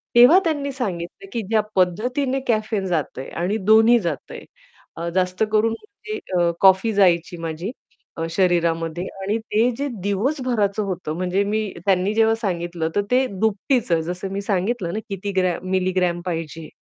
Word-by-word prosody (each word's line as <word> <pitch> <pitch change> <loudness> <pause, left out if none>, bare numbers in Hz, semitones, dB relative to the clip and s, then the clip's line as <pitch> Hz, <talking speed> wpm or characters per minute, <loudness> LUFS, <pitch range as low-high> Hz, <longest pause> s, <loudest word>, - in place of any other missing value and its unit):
तेव्हा 250 +10 +8
त्यांनी 290 -4 -1
सांगितलं, 195 -6 -5
की 230 - -1
"ज्या 220 -1 +3
पद्धतीने 245 +9 +1
कॅफेन 215 -3 0
जातंय 155 -6 -3
आणि 200 +5 0
दोन्ही 225 +2 +6
जातंय," 170 -8 -5 0.5
अ, 170 +1 -3
जास्त 185 +2 +1
करून 220 +1 +3
म्हणजे 425 - -7 0.2
अ, 170 -1 +3
कॉफी 190 +3 +5
जायची 175 -3 +3
माझी 165 +5 -4 0.5
अ, 165 - -1
शरीरामध्ये. 170 -2 +1 0.2
आणि 205 +3 0
ते 225 +2 +1
जे 285 +1 -2 0.2
दिवसभराचं 215 -1 0
होतं 175 -5 -4
म्हणजे 185 +2 0
मी 215 +1 0 0.3
त्यांनी 195 +1 +2
जेव्हा 225 0 +3
सांगितलं 175 -6 -2
तर 205 - +3
ते 260 +1 +4
दुपटीच 220 +1 0
जसं 175 +4 -2
मी 200 - -2
सांगितलं 200 -1 -1
ना 215 - -2
किती 200 +1 -4
ग्रॅम 185 0 0
मिलीग्रॅम 185 -2 +1
पाहिजे. 165 -2 -4
195 Hz, 150 wpm, -22 LUFS, 175-225 Hz, 0.5 s, तेव्हा